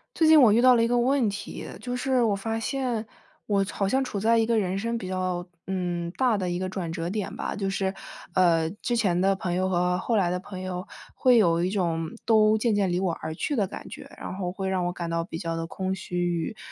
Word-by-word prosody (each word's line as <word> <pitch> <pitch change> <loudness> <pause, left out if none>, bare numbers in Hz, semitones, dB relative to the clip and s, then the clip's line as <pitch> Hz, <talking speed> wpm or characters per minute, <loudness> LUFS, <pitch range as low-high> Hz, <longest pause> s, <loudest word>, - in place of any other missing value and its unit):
最 320 - +3
近 315 -1 +8
我 230 -5 +7
遇 230 - +4
到 255 0 +7
了 230 - +3
一 - - +3
个 245 - +2
问 255 -2 +2
题， 200 +1 -6
就 250 0 -4
是 255 0 +1
我 220 -4 +2
发 225 +3 -3
现， 245 -3 -2 0.4
我 200 -2 +1
好 195 - -1
像 265 +6 +2
处 215 -6 -4
在 225 +3 +3
一 225 - +3
个 230 -1 +2
人 190 -1 -1
生 230 +3 -2
比 200 -5 -6
较， 185 -1 -2 0.2
嗯， 175 -2 -2
大 250 -5 +3
的 185 -2 -2
一 175 0 -2
个 185 - -2
转 185 -3 -4
折 165 +1 -3
点 205 +1 -3
吧。 - - -4
就 195 -2 -2
是， 195 0 -1 0.4
呃， 165 -3 +3
之 240 - 0
前 185 -6 +2
的 195 +1 +3
朋 180 -2 -2
友 185 +1 0
和 180 0 +1
后 230 +3 0
来 185 -4 +2
的 180 - 0
朋 185 0 -8
友， 185 0 -4 0.3
会 250 -2 +5
有 170 -5 +3
一 180 - +1
种 170 -5 -1 0.2
都 215 -1 +5
渐 220 -1 +1
渐 195 -3 +1
离 175 - +1
我 185 -3 0
而 160 0 -4
去 290 - -2
的 205 -6 +1
感 - - -9
觉， - - -10
然 - - -6
后 180 -2 -3
会 190 +1 -4
让 185 -2 0
我 175 - 0
感 175 -1 -5
到 165 0 0
比 165 -1 -6
较 165 0 -3
地 165 0 -3
空 190 +3 -3
虚 180 -1 -6
与 175 +3 -1
190 Hz, 275 characters per minute, -26 LUFS, 180-225 Hz, 0.4 s, 近